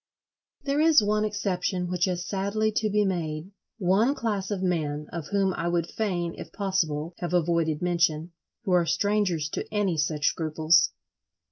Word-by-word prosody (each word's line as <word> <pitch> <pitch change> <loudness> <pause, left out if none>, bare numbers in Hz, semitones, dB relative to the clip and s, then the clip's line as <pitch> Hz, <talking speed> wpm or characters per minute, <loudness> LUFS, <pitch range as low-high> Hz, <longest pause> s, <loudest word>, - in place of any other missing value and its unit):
There 280 +1 +1
is 315 -7 +6
one 210 +1 +1
exception 190 -3 -1
which 180 0 +1
has 180 -2 -2
sadly 200 +3 0
to 215 0 0
be 210 0 +2
made—one 190 - -1
class 205 -6 -2
of 195 -3 -2
men, 150 -5 -1
of 165 -3 -5
whom 195 -2 +1
I 170 - -3
would 170 -1 +1
fain, 175 -6 -2
if - - -8
possible, 170 -5 -1
have 175 0 -2
avoided 165 -2 +1
mention, 170 -2 +1 0.3
who 195 - -2
are 175 -2 +3
strangers 200 -7 +1
to - - -5
any 205 -5 0
such 150 -1 0
scruples. 160 +1 +3
180 Hz, 155 wpm, -26 LUFS, 165-205 Hz, 0.3 s, is